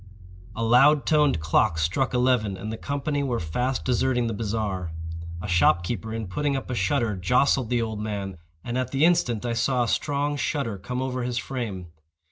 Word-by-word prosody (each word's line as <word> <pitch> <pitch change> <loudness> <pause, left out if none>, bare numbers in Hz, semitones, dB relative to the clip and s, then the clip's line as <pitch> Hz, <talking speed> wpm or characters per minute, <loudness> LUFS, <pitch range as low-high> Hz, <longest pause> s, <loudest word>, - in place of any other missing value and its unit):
A 115 - -2
loud 135 +6 +5
toned 150 - +3
clock 80 +3 +2
struck 85 - 0
eleven, 125 -6 +2
and 110 +4 -5
the - - -2
company 145 +1 -2
were 125 -4 -1
fast 125 +11 -2
deserting 125 -1 +1
the 115 - -1
bazaar. 100 -5 -2 0.5
A - - -4
shop 85 -1 +3
keeper, 110 +4 -4
in 110 0 -3
putting 140 +10 -1
up 135 -1 -4
a - - -1
shutter, 110 +1 0
jostled 125 +5 +2
the 120 -1 +1
old 110 -2 -4
man, 100 -4 -4 0.2
and 120 +2 -2
at 130 -1 -2
the 140 +4 +3
instant 125 -10 +2
I 120 - -1
saw 125 +2 +1
a - - -1
strong 145 +3 0
shudder 125 -9 -2
come 125 +7 -3
over 130 -1 -2
his 120 0 -2
frame. 110 -10 -4
120 Hz, 190 wpm, -25 LUFS, 105-130 Hz, 0.5 s, loud